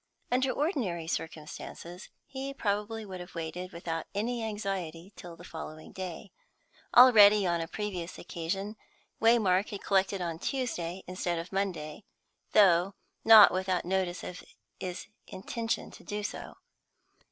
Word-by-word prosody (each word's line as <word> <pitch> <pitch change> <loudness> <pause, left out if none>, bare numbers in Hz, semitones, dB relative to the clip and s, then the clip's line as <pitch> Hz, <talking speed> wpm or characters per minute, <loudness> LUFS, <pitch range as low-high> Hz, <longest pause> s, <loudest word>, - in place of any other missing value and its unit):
Under 260 +2 +2
ordinary 250 - -1
circumstances 165 +3 -6 0.2
he 275 0 -6
probably 210 -1 -2
would 190 -2 -7
have 180 0 -10
waited 170 +2 -5
without 165 -1 -4
any 230 +3 -1
anxiety 195 -4 -4
till 175 -1 -10
the 175 - -14
following 155 -2 -8
day; 185 0 -7 0.7
already 210 -5 +8
on 170 -1 +1
a 165 - -3
previous 185 -3 -5
occasion 195 +5 -4 0.4
Waymark 215 -4 +4
had 205 -3 -7
collected 195 0 +2
on 170 -2 -3
Tuesday 190 -10 -3
instead 180 -1 -2
of 170 +1 -6
Monday, 185 -3 -3 0.5
though 190 -2 +5 0.3
not 220 -4 +9
without 185 -1 0
notice 185 -1 -1
of 180 - -7 0.4
his 180 -2 -5 0.2
intention 225 +4 -3
to - - -14
do 210 0 -4
so. - - -6
190 Hz, 130 wpm, -30 LUFS, 170-210 Hz, 0.7 s, not